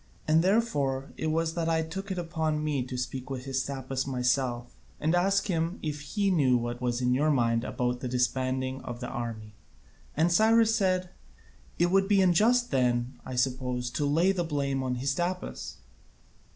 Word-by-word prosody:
And 160 +2 +4
therefore 145 -11 0
it - - -3
was 160 +1 0
that 165 -1 -1
I 160 0 +2
took 195 +5 -6
it 190 - -3
upon 160 -3 -1
me 150 -3 0
to 125 - -5
speak 130 +1 -4
with 130 -1 -5
Hystaspas 135 0 -3
myself, 125 -1 0 0.3
and 160 +2 +1
ask 195 +3 +2
him 170 -1 -1
if 150 -2 -3
he 195 +7 0
knew 135 -8 +3
what 120 +1 -4
was 120 0 -1
in 125 0 +2
your 145 +4 +2
mind 115 -5 +2
about 125 -1 -2
the 130 - -4
disbanding 130 +1 -1
of 120 -1 -7
the 125 - -5
army." 115 -4 -5 0.6
And 165 +3 +3
Cyrus 225 +3 +4
said, 185 -4 +1 0.7
"It 175 +1 +2
would 195 0 +3
be 200 -1 +4
unjust 215 +7 +3
then, 125 -2 0
I 130 - -5
suppose, 125 -1 -1
to 145 +2 -1
lay 165 +6 +3
the 185 -3 -1
blame 140 -4 -1
on 130 -1 -1
Hystaspas." 175 +8 -3
140 Hz, 175 wpm, -28 LUFS, 125-175 Hz, 0.7 s, And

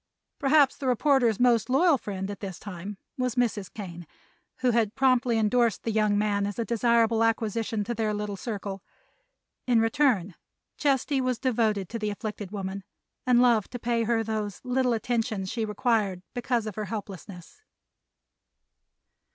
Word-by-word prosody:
Perhaps 280 -1 +4
the 270 - -4
reporter's 250 -3 +3
most 240 -3 +3
loyal 320 +5 +4
friend 195 -5 -4
at 200 - -8
this 190 -3 -6
time 195 0 -7 0.2
was 250 -2 0
Mrs. 220 -6 0
Kane, 175 -5 -8 0.5
who 250 -1 +3
had 225 -2 +1
promptly 255 -3 +3
endorsed 225 0 +2
the 225 - -1
young 210 -1 +2
man 205 -1 +1
as 205 - -5
a 230 - -1
desirable 230 -1 +2
acquisition 225 -1 0
to 240 - -3
their 220 -1 -1
little 210 -1 -3
circle. 200 -2 -5 0.9
In 240 -2 +4
return 225 -5 +2 0.4
Chesty 275 -1 +1
was 255 -2 0
devoted 220 -6 0
to 230 - -4
the 210 -1 -1
afflicted 210 -1 -5
woman 195 -1 -5 0.4
and 245 -1 +5
loved 235 -4 +3
to - - -2
pay 235 -1 0
her 230 0 +1
those 215 -3 -3
little 250 -1 +1
attentions 225 -4 -1
she 230 -2 -1
required 210 -4 0
because 240 -2 -1
of 215 - -4
her 215 +2 -4
helplessness. 200 - -8
225 Hz, 155 wpm, -27 LUFS, 205-245 Hz, 0.9 s, and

